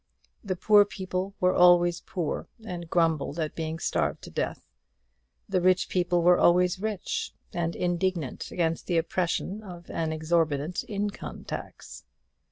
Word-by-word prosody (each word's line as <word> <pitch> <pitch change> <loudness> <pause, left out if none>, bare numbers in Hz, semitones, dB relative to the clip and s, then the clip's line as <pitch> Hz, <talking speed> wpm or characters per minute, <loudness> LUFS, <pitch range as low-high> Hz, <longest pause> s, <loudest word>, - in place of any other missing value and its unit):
The 185 - -2
poor 205 +3 +6
people 190 -1 -4
were 180 0 +3
always 175 -1 +5
poor, 175 -5 -3 0.2
and 175 -4 -6
grumbled 165 -3 +1
at 155 -2 -2
being 160 0 -3
starved - - -1
to - - -9
death; - - -3 0.8
the 185 - +1
rich 185 0 +3
people 175 -1 +1
were 175 +1 +6
always 180 +1 +4
rich, 215 -2 -3 0.2
and 170 -1 -1
indignant 175 -5 -1
against 165 -2 -1
the 175 - +1
oppression 180 +4 -1
of 175 -4 -10
an 160 -1 -1
exorbitant 160 0 0
income 205 -1 -4
tax. - - -8
175 Hz, 140 wpm, -27 LUFS, 165-185 Hz, 0.8 s, poor